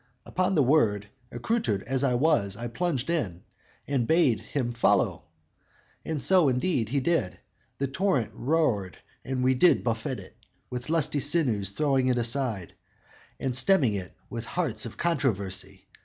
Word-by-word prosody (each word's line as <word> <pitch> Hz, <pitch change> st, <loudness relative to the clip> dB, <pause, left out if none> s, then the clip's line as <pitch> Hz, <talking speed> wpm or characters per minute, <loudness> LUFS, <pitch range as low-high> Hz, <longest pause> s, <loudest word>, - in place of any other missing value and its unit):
Upon 185 Hz, +1 st, 0 dB
the 150 Hz, -, +4 dB
word, 110 Hz, -8 st, +2 dB, 0.2 s
Accoutered 120 Hz, -, -1 dB
as 135 Hz, +1 st, -1 dB
I 130 Hz, -3 st, +2 dB
was, 115 Hz, -8 st, +1 dB
I 120 Hz, +1 st, -4 dB
plunged 135 Hz, 0 st, -2 dB
in 100 Hz, -, -2 dB, 0.4 s
And 130 Hz, -5 st, 0 dB
bade 160 Hz, -9 st, +3 dB
him 125 Hz, -4 st, -3 dB
follow; 120 Hz, -, +1 dB, 0.9 s
so, 175 Hz, 0 st, +4 dB
indeed, 125 Hz, -, 0 dB
he 140 Hz, +3 st, +1 dB
did. 150 Hz, -, 0 dB, 0.4 s
The 140 Hz, -, -1 dB
torrent 140 Hz, -, 0 dB
roared 125 Hz, -, 0 dB, 0.3 s
and 130 Hz, -1 st, -2 dB
we 130 Hz, +1 st, +4 dB
did 175 Hz, +8 st, +4 dB
buffet 115 Hz, -2 st, -2 dB
it -, -, -13 dB, 0.4 s
With 125 Hz, +2 st, -5 dB
lusty 155 Hz, -3 st, +1 dB
sinews; 130 Hz, -, +1 dB
throwing 135 Hz, +2 st, +1 dB
it 125 Hz, -1 st, +2 dB
aside 115 Hz, -6 st, -1 dB, 0.7 s
And 130 Hz, -2 st, -2 dB
stemming 130 Hz, -, +4 dB
it 95 Hz, -2 st, -6 dB
with 115 Hz, -1 st, -6 dB
hearts 125 Hz, -11 st, -2 dB
of -, -, -11 dB
controversy. 110 Hz, -, -1 dB
130 Hz, 145 wpm, -27 LUFS, 115-155 Hz, 0.9 s, the